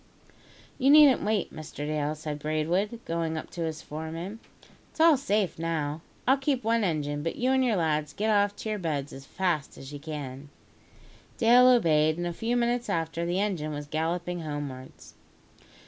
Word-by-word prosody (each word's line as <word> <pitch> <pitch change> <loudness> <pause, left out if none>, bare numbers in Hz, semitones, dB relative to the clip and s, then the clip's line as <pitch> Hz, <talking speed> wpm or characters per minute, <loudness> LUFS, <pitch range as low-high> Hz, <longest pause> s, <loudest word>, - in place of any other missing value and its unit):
"You 265 - +3
needn't 290 -2 +7
wait, 210 -1 -1
Mr 155 -1 -7
Dale," 150 0 -1
said 150 -1 -5
Braidwood, 170 +9 -1
going 165 -1 -2
up - - -7
to 170 - -6
his 160 0 -5
foreman. 165 +7 -6 0.5
"It's - - -22
all 325 -1 +7
safe 210 - 0
now. 160 -2 -2 0.3
I'll 265 +2 +5
keep 270 -2 -1
one 230 0 +2
engine; 145 -5 -1
but 165 +2 -3
you 255 +2 +1
and 265 0 +3
your 240 -4 +2
lads 155 -4 0
get 215 +8 -1
off 205 -1 +2
to 220 - -6
your 210 - -2
beds 145 -5 -3
as 135 0 -11
fast 175 -7 -2
as 135 +2 -10
ye 145 - -6
can." 145 -2 -7 0.9
Dale 245 +2 +6
obeyed, 155 -10 +4
and 175 - -2
a 175 - -2
few 230 +7 -1
minutes 240 -1 0
after, 165 -1 -1
the 175 +2 0
engine 175 -7 -1
was 145 0 -5
galloping 170 +4 -2
homewards. 145 -5 -7
165 Hz, 180 wpm, -28 LUFS, 150-215 Hz, 0.9 s, needn't